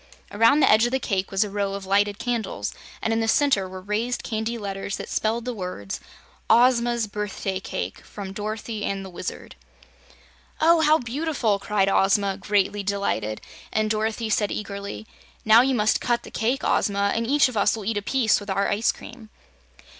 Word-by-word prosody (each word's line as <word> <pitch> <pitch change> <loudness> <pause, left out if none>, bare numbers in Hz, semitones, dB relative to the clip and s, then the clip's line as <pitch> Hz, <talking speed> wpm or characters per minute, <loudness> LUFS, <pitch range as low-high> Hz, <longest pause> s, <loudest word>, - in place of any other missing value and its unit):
Around 230 +8 +4
the - - +5
edge 220 +3 +5
of - - -4
the 265 - +2
cake 195 -6 -1
was 195 +2 +2
a 210 - -5
row 200 -1 -1
of 200 -1 -6
lighted 200 +1 +2
candles, 230 - -3 0.3
and 225 - +1
in 225 - +1
the 225 - 0
center 225 -7 +2
were 185 0 -9
raised 220 +5 -2
candy 220 +1 -2
letters 195 -2 -4
that - - -7
spelled 225 +2 -1
the 250 - -2
words: 180 - -5 0.5
OZMA'S 240 -1 +4
Birthday 200 -2 -4
Cake 95 - -5
from 195 -2 -8
Dorothy 215 +1 -4
and 195 -1 -2
the 190 - -9
Wizard 175 - -7 1.0
"Oh, 330 +1 +5
how 310 0 +5
beautiful!" 245 -5 -1
cried 200 -1 +1
Ozma, 195 0 +2
greatly 205 0 0
delighted, 195 - -2 0.3
and 215 -1 0
Dorothy 220 +1 -1
said 205 0 +1
eagerly: 200 +1 -5 0.4
"Now 220 +2 +8
you 265 +1 +1
must 215 -1 +2
cut 240 -1 0
the - - -11
cake, 245 +4 -1
Ozma, 200 0 +1
and 230 0 -1
each 285 +2 +4
of 255 - -7
us 205 - +3
will 215 -3 -7
eat 220 0 -1
a - - -1
piece 235 +1 +2
with 205 -1 -10
our 195 +1 +1
ice 210 +3 +2
cream." 230 -2 -12
210 Hz, 185 wpm, -24 LUFS, 200-235 Hz, 1.0 s, Now